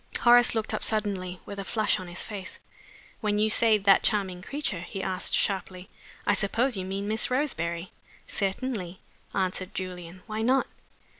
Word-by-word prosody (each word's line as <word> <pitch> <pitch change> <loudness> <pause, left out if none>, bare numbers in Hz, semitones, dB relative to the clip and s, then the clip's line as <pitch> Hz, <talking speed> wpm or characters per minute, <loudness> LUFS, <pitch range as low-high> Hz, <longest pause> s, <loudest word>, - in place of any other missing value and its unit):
Horace 240 0 +6
looked 220 -1 -1
up - - -2
suddenly, 195 -4 -1
with 200 - -7
a - - -3
flush 215 +1 +1
on 185 - -7
his 175 +1 -4
face. 200 -3 -6 0.6
"When 210 -1 0
you 215 +1 +3
say 225 -1 +5
'that 195 -1 +5
charming 190 -4 0
creature,'" 255 - -3
he 190 +2 -6
asked, 185 -1 +1
sharply, 190 -1 -1 0.3
"I - - +4
suppose 235 +5 +1
you 190 -1 -3
mean 195 +2 -3
Miss 220 +1 +1
Roseberry?" 175 - -1 0.3
"Certainly," 195 -2 -2 0.4
answered 185 -1 -1
Julian. 180 -1 -6
"Why 215 0 -3
not?" 260 +4 +3
195 Hz, 160 wpm, -27 LUFS, 185-220 Hz, 0.6 s, Horace